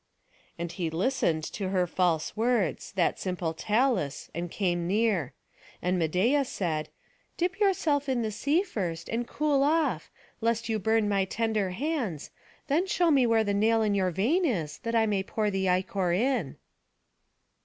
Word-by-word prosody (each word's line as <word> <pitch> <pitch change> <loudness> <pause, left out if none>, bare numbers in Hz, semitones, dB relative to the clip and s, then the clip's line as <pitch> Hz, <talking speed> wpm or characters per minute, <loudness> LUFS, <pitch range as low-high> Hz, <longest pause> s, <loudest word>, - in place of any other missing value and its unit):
And 170 0 -4
he 175 -2 -3
listened 165 -3 0
to 195 -3 -3
her 185 -2 +2
false 175 -3 0
words, 225 - 0
that 185 -4 +1
simple 180 -3 -2
Talus, 215 - 0
and 170 +1 -4
came 175 -2 -1
near; 205 - +1 0.5
and 180 0 0
Medeia 190 - +2
said, 170 - -3 0.5
"Dip 365 +3 -1
yourself 315 -8 +1
in 250 -3 +1
the 215 - -2
sea 285 - +1
first, 175 - -4
and 235 +1 -2
cool 295 -2 +1
yourself, 310 +4 +1 0.3
lest 230 0 0
you 220 -1 0
burn 220 +1 +2
my 200 -2 +1
tender 215 -1 -1
hands, 230 - -3 0.3
then 315 +6 +1
show 350 -2 +2
me 265 -4 +4
where 225 -1 +3
the 205 -1 -1
nail 220 +2 +3
in 210 -1 +1
your 190 -2 +1
vein 235 - +1
is, 175 - -1
that 230 0 -3
I 225 -1 +4
may 205 -3 +1
pour 210 +2 -1
the 190 -1 0
ichor 185 0 0
in." 220 - 0
210 Hz, 165 wpm, -28 LUFS, 180-250 Hz, 0.5 s, me